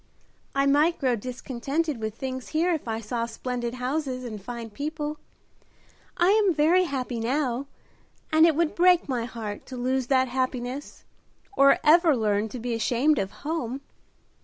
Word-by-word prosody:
"I 275 0 +3
might 300 +5 +3
grow 255 -4 +1
discontented 255 +5 -3
with 220 -1 -4
things 260 0 -5
here 335 +3 +1
if 310 -6 -4
I 225 0 -2
saw 230 +2 -2
splendid 240 +1 -4
houses 255 0 -2
and 215 -4 -6
fine 235 +1 -7
people. 300 +4 -4 1.0
I 350 +1 +4
am 410 -5 +3
very 335 +5 +4
happy 255 -6 -3
now, 255 +2 -1 0.7
and 315 +1 +7
it 320 - +2
would 330 0 +1
break 360 0 +4
my 245 -4 -1
heart 220 -4 -7
to 255 - -7
lose 255 +1 0
that 260 -1 +3
happiness, 255 +1 -3 0.5
or 275 0 +6
ever 320 -2 +5
learn 210 -1 0
to 250 - -7
be 240 +1 -3
ashamed 245 +6 +2
of 195 -1 -1
home." 265 +3 -4
260 Hz, 160 wpm, -26 LUFS, 235-305 Hz, 1.0 s, and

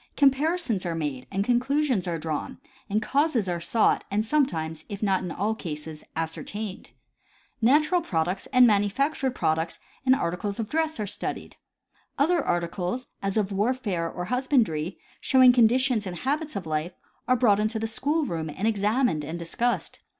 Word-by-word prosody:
Comparisons 280 - +2
are 170 -2 -2
made 145 -5 -3
and 195 +1 0
conclusions 250 - +1
are 170 -1 -1
drawn, 155 -1 -4 0.3
and 215 +2 0
causes 275 -5 +1
are 175 -1 -2
sought 215 +6 +2
and 210 +2 0
sometimes, 165 - 0
if 200 +1 -5
not 195 -2 +2
in 180 - -4
all 205 +6 -1
cases, 155 -6 -7
ascertained. 185 +5 -5 0.7
Natural 305 +9 +4
products 180 - -1
and 255 -2 +6
manu 205 -3 +3
factured 270 +2 -1
products 160 -2 0 0.3
and 260 0 +5
articles 200 +2 -2
of 220 -1 -3
dress 315 -3 0
are 210 - -1
studied. 200 - -5 0.6
Other 335 +4 +2
arti 175 0 0
cles, 180 +8 -3 0.2
as 195 +1 -1
of 205 -2 +1
warfare 200 -5 -1
or 180 - -5
husbandry, 220 - 0 0.2
showing 255 -2 +6
conditions 245 -2 +3
and 175 -1 -5
habits 300 - -2
of 195 -3 -4
life, 155 +3 -2 0.3
are 255 - +4
brought 220 -5 +4
into 215 +2 0
the 220 - -2
school 290 +8 0
room 165 - -3
and 190 +8 -2
examined 210 - +1
and 160 +4 -5
discussed. 230 +9 -2
210 Hz, 165 wpm, -26 LUFS, 175-255 Hz, 0.7 s, and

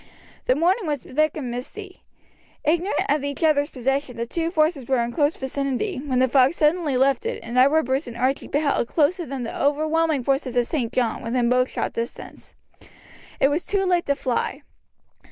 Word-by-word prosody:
The 255 - +4
morning 355 - +1
was 290 -4 -2
thick 310 +3 0
and 255 -5 -4
misty. 365 - -8 0.6
Ignorant 335 +1 +1
of 290 0 +1
each 285 +3 -3
other's 295 -2 +3
position, 270 -1 -2
the 235 - -2
two 330 +7 -2
forces 310 -6 +1
were 265 -2 +2
in 235 - -3
close 290 +4 +1
vicinity, 275 - -2
when 265 -4 -1
the 260 +1 +4
fog 260 +3 +4
suddenly 305 -3 +1
lifted, 265 -1 +1
and 235 - -6
Edward 280 +5 +5
Bruce 265 +3 -1
and 235 -1 -8
Archie 260 +3 0
beheld 285 -4 0
close 315 +6 +2
to 345 - -5
them 265 -1 -4
the 230 - -5
overwhelming 310 0 +1
force 275 +2 0
of 250 - -6
St. 240 -5 -2
John, 245 -3 0
within 235 +1 0
bowshot 255 +1 0
distance. 230 +1 -7 0.8
It 275 - +4
was 305 +5 -1
too 395 -1 +1
late 355 -2 +1
to 280 - +2
fly. 275 +1 -2
280 Hz, 185 wpm, -23 LUFS, 255-315 Hz, 0.8 s, Edward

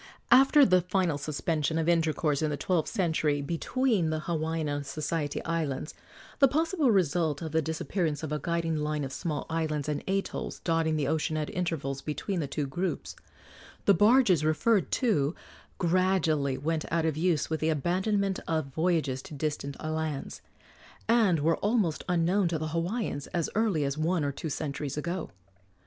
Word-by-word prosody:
After 270 +3 +7
the 185 -1 +4
final 180 -4 0
suspension 155 +1 -1
of 165 0 0
intercourse, 160 -3 +1
in 155 - +1
the 145 - -2
twelfth 175 -2 0
century, 160 -7 +1
between 175 - 0
the 155 0 -1
Hawaiian 160 -1 -2
and 145 0 -2
Society 150 +1 -3
Islands 155 -3 -2 0.5
the 275 - +7
possible 315 +1 +1
result 170 -6 +1
of 160 - -4
the 160 +1 +2
disappearance 160 0 -2
of 155 - -4
a 150 - -1
guiding 165 -1 -1
line 150 0 -1
of 135 -1 -5
small 155 -4 -3
islands 155 -3 -2
and 150 -1 -2
atolls 195 +1 -2
dotting 165 -2 +1
the 145 -3 0
ocean 155 +1 0
at 155 -1 -3
intervals 155 -6 -2
between 175 +6 -3
the 150 - -2
two 145 +1 -2
groups 175 +8 -3 0.7
the 200 - +6
barges 205 - +5
referred 185 +7 +2
to 160 - +1 0.4
gradually 170 -6 +1
went 155 +3 -1
out 165 0 +1
of 160 -3 0
use 160 -1 0
with 160 - 0
the 160 - +1
abandonment 190 +6 0
of 155 -5 -1
voyages 160 -5 0
to 150 - -10
distant 145 -1 -3
lands, 155 -2 -3 0.7
and 215 -9 +3
were 165 +2 +2
almost 205 -7 0
unknown 180 +2 +2
to 165 -1 -1
the 155 0 -3
Hawaiians 170 - -2
as 170 -2 0
early 210 -9 +1
as 140 +2 -2
one 165 +1 +1
or 145 - 0
two 155 +3 -5
centuries 145 -1 -4
ago. 170 +3 -3
160 Hz, 165 wpm, -28 LUFS, 150-180 Hz, 0.7 s, After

